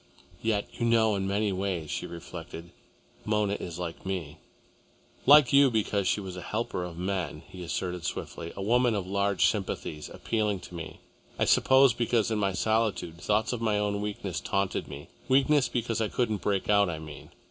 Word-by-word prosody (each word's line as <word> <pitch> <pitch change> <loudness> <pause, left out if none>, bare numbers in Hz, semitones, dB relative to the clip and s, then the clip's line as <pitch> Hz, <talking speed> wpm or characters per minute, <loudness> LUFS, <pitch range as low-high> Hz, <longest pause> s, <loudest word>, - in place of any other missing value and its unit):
"Yet, 110 -3 0
you 120 - +1
know, 110 -2 +4
in 95 -1 -1
many 100 +1 +1
ways," 90 -5 -2
she - - -3
reflected, 85 0 -9 0.5
"Mona 105 -2 +1
is 85 -1 -6
like 85 -2 -5
me." 90 -6 -4 0.9
"Like 145 -2 +8
you 140 -1 +7
because 105 -4 0
she - - +2
was 95 -2 -6
a 90 - -6
helper 105 -1 -3
of 85 -2 -7
men," 90 -3 -3
he 95 -1 -10
assented 90 0 -3
swiftly, 85 0 -5
"a 100 - -4
woman 120 +2 +3
of 100 -3 -2
large 100 0 +1
sympathies, 90 -6 -2
appealing 105 -4 -1
to - - -12
me, 80 -2 -8 0.4
I - - +2
suppose, 130 -2 +5
because 115 -1 +1
in 110 - 0
my 100 -2 +1
solitude, 105 -5 0
thoughts 110 +3 +1
of 120 - -4
my 110 -2 +1
own 105 0 -1
weakness 100 -3 -3
taunted 100 -1 -1
me, 70 +1 -9 0.2
weakness 135 0 +4
because 115 -2 -1
I 110 - +1
couldn't 110 -5 -1
break 100 -2 0
out, 100 -2 +4
I 80 - -3
mean. 75 -3 -10
100 Hz, 180 wpm, -28 LUFS, 90-110 Hz, 0.9 s, Like